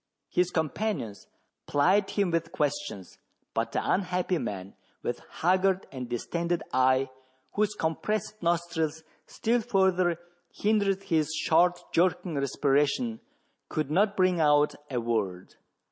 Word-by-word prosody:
His 180 0 +2
companions 160 - -2 0.4
plied 185 +8 +3
him 200 -4 +1
with 165 0 -1
questions; 145 - -3 0.3
but - - -1
the - - -1
unhappy 180 -2 +1
man, 95 -1 -5 0.3
with - - -3
haggard 185 +2 +2
and 125 -3 -6
distended 170 +8 -2
eye, 130 +1 +3 0.4
whose 210 0 0
compressed 210 +5 -2
nostrils 165 -2 0 0.2
still 235 +1 0
further 190 -5 +2 0.3
hindered 200 -2 +1
his 160 -4 +1
short 175 +2 +3
jerking 180 0 +2
respiration, 145 - +1 0.5
could 155 -2 -2
not 200 +5 +2
bring 185 -2 +3
out 150 -1 +4 0.2
a 125 -3 -1
word. 105 -6 -2
170 Hz, 115 wpm, -28 LUFS, 145-190 Hz, 0.5 s, out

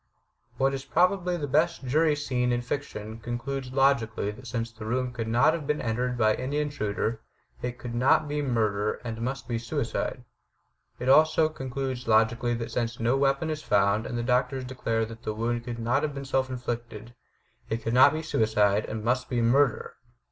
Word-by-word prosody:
What 135 +1 +2
is 135 -1 -4
probably 180 +2 +2
the 150 - -3
best 155 +1 +1
jury 155 +4 +3
scene 125 -4 0
in 120 0 0
fiction 115 -4 -5
concludes 125 +3 -4
logically 120 -6 +2
that 125 +5 -12
since 115 -1 -3
the 115 -1 -10
room 125 +3 -1
could 115 -3 -4
not 120 +7 +4
have 160 -4 -4
been 150 - 0
entered 125 +2 -1
by 110 -2 +4
any 130 +5 -3
intruder 115 -6 -2 0.4
it 125 0 -4
could 120 -1 -7
not 135 +5 +3
be 145 0 -1
murder 110 -6 0
and 115 -1 -5
must 125 0 -3
be 115 -1 -1
suicide. 115 -1 -3 0.7
It 125 - -5
also 155 +3 +5
concludes 130 -3 -4
logically 115 +2 +3
that 115 0 -5
since 120 0 -2
no 115 +3 +2
weapon 140 +3 +1
is 155 -1 -4
found 100 -2 +2
and 120 - -4
the 120 - -1
doctors 125 +1 +1
declare 115 -3 -1
that 115 +1 -10
the 110 -3 -4
wound 120 +1 -2
could 120 -1 -5
not 120 +4 +1
have 150 -2 -2
been 140 0 -5
self 130 0 0
inflicted, 120 -2 -5 0.6
it 115 +1 -2
could 115 - -1
not 130 +2 +7
be 155 +1 -3
suicide 105 -7 +2
and 110 -1 -5
must 125 +2 0
be 125 - 0
murder! 125 +2 +2
125 Hz, 190 wpm, -27 LUFS, 115-135 Hz, 0.7 s, not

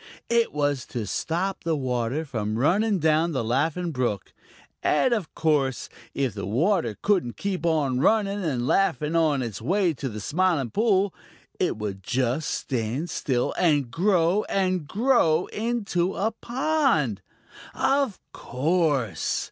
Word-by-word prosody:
It 235 -1 +3
was 145 -3 -1
to 115 -3 -4
stop 175 - -2
the 165 -1 0
water 130 +2 -1
from 110 -6 -3
running 200 - +2
down 160 0 +2
the 130 -4 -1
Laughing 160 +9 0
Brook. 125 - -2 0.5
And 240 +11 +2
of 205 -9 -3
course, 145 -5 0 0.3
if 135 -6 0
the 100 -2 -5
water 130 - +1
couldn't 185 - 0
keep 185 -4 -2
on 145 -6 +1
running 205 +4 +2
and 130 -7 -1
laughing 155 -2 +1
on 155 -5 +2
its 110 -5 -5
way 180 - +1
to 135 -2 -4
the 110 -1 -6
Smiling 155 - 0
Pool, 200 -3 +2 0.5
it - - 0
would 100 -3 -5
just 130 +8 -1
stand 130 +6 -2
still 125 -3 -1
and 145 -8 +2
grow 180 +2 +2
and 185 -5 0
grow 195 - +2
into 205 -6 -1
a 220 +3 0
pond. 240 - 0 0.5
Of 270 -5 +1
course! 140 - 0
155 Hz, 140 wpm, -25 LUFS, 125-195 Hz, 0.5 s, It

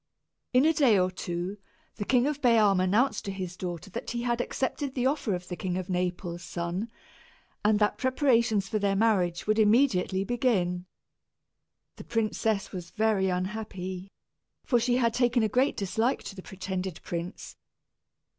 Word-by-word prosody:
In 255 +3 +4
a 320 - +5
day 270 -9 +4
or 185 0 +2
two, 180 +2 -4 0.4
the 205 - -3
King 250 +1 +3
of 290 0 -2
Bealm 215 -6 +4
announced 215 +5 +2
to 200 - -2
his 185 -2 -5
daughter 180 0 -6
that - - -5
he 240 0 -3
had 240 0 0
accepted 265 +2 -2
the 250 -1 0
offer 260 -7 +1
of 180 0 -7
the 180 - -4
King 180 +2 -3
of 185 0 -4
Naples' 180 -1 -2
son, 175 +6 -3 0.7
and 210 0 +4
that 210 0 +1
preparations 235 -6 +2
for 215 - -1
their 200 -1 +1
marriage 195 -5 +2
would 215 +1 +2
immediately 210 -4 +3
begin. 195 -7 0 1.1
The - - -8
princess 220 -2 -1
was 180 -3 -7
very 215 -3 +1
unhappy, 185 0 -4 0.6
for 245 -4 +3
she 245 +1 +2
had 230 -3 +2
taken 245 -1 +2
a - - +3
great 255 +6 +1
dislike 220 +6 0
to 195 - -8
the 190 - -8
pretended 185 -2 -5
prince. 170 +2 -6
205 Hz, 165 wpm, -28 LUFS, 185-240 Hz, 1.1 s, a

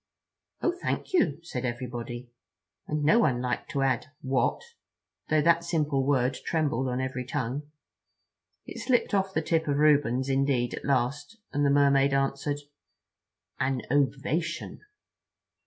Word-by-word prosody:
"Oh, 355 - +3
thank - - -2
you," 160 - +3
said 130 -7 -5
everybody, 120 0 -5 0.6
and 150 0 -1
no 185 +11 +5
one 130 - +2
liked 125 0 -2
to 140 - 0
add: 130 +1 +1 0.2
"What?"—though 150 - -2
that 170 +1 +4
simple 150 -5 0
word 130 -2 +2
trembled 145 -5 0
on 125 0 -1
every 130 -1 -3
tongue. 135 +3 -3 1.0
It - - -8
slipped 245 -4 +1
off 195 -1 +1
the 160 -4 -1
tip 165 0 0
of 140 -1 +1
Reuben's, 140 -4 +3
indeed, 135 -3 +1
at - - -6
last, 140 - -1 0.2
and 145 0 +1
the 140 - +4
Mermaid 140 -1 +4
answered: 140 +1 -1 1.0
"An 130 -1 0
ovation." 145 +4 -1
140 Hz, 135 wpm, -28 LUFS, 130-155 Hz, 1.0 s, no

